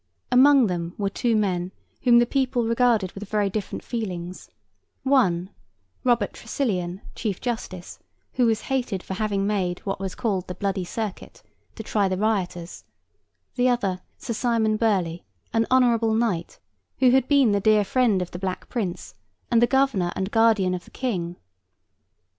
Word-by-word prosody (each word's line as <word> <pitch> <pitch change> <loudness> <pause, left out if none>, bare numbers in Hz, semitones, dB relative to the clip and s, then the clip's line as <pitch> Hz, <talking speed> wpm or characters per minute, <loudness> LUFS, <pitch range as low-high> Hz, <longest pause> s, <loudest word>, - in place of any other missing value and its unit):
Among 265 +1 +6
them 175 -3 -3
were 200 -1 -1
two 235 +3 0
men 185 -4 0 0.3
whom 240 -2 +5
the 240 - +5
people 255 -2 0
regarded 230 -5 +2
with 200 0 -9
very 205 -2 +1
different 210 -1 -4
feelings; 185 -6 -5 0.5
one, 190 -10 +2 0.5
Robert 240 -5 +2
Tresilian, 195 -7 -3
Chief 205 -5 -3
Justice, 210 -7 -5 0.3
who 245 -2 +3
was 220 -1 +1
hated 245 -8 -2
for - - -5
having 200 0 -1
made 190 -4 0
what 195 -2 -2
was 190 -1 -4
called 195 -6 -1
'the 180 - -5
bloody 195 -2 -2
circuit' 215 +1 -6 0.3
to 220 - -7
try 205 -2 +1
the 185 0 -1
rioters; 185 -5 -2 0.7
the 250 0 +2
other, 195 -7 0 0.2
Sir 235 - -4
Simon 225 -2 +1
Burley, 190 -7 0 0.3
an 225 0 +2
honourable 235 -3 +3
knight, 210 -8 -1 0.4
who 255 -1 +5
had 260 0 +3
been 280 -6 +4
the 200 - +2
dear 215 +1 +4
friend 220 -5 +2
of 180 - -10
the 175 - -6
Black 185 -1 -4
Prince, 200 -8 -4 0.4
and 235 -1 +4
the 240 - +5
governor 265 -10 +2
and 190 +2 -3
guardian 220 -5 +3
of 180 - -4
the - - -16
King. 180 -9 -3
215 Hz, 160 wpm, -24 LUFS, 185-240 Hz, 0.7 s, Among